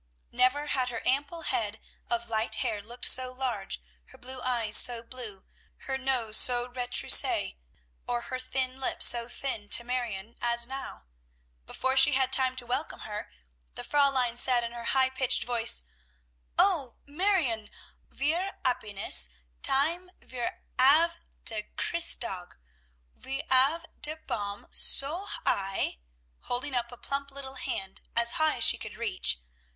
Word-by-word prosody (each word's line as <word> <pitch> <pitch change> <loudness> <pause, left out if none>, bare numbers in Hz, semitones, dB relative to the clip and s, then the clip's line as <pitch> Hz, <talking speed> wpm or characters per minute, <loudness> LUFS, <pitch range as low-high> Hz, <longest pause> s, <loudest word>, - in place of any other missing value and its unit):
Never 275 +4 +2
had 260 -4 0
her 230 -2 -5
ample 290 +5 0
head 220 -5 -1 0.3
of 235 0 -1
light 220 -1 -1
hair 215 -4 -2
looked 235 +4 -4
so 255 0 +3
large, 250 - -3 0.3
her - - -17
blue 255 +1 -7
eyes 235 -4 +1
so 235 -2 +5
blue, 230 -5 -9 0.4
her 265 - -3
nose 255 -5 +2
so 245 -1 +3
retroussé, 245 - +2 0.5
or 240 0 -1
her 255 +2 -5
thin 255 0 -3
lips 265 - 0
so 235 -1 +4
thin, 225 -6 -4
to 235 - +5
Marion, 235 -4 -4
as 235 0 +1
now. 265 - -7 0.6
Before 260 0 -1
she 270 +2 +8
had 265 0 +2
time 260 -1 +3
to 250 -1 -4
welcome 255 +6 -3
her, 210 -1 -6 0.4
the - - -5
Fräulein 265 -4 +2
said 245 -2 +3
in 235 - -4
her 235 -1 -7
high 260 0 +2
pitched 260 -1 +1
voice, 235 - +2 0.7
"O 310 - +2
Marione! 285 - 0 0.4
Wir 340 +8 -1
happiness 200 - 0 0.3
time 335 +7 +1
wir 245 -2 -5 0.2
have 320 +6 +5 0.3
der 220 -2 +4 0.2
Christtag. 235 - -1 0.6
Wir 270 +2 -5
'ave 280 +6 +3 0.2
der 305 +1 -2
Baum 205 -9 -5
so 330 +9 +3 0.2
high," 195 - 0 0.5
holding 255 +3 -2
up 240 -1 -1
a 245 - -10
plump 280 +2 -4
little 270 -1 -9
hand 195 -7 -4
as 235 0 +3
high 315 0 +1
as 235 - +2
she - - +7
could 215 -1 -7
reach. 200 - +1
250 Hz, 145 wpm, -29 LUFS, 230-270 Hz, 0.7 s, she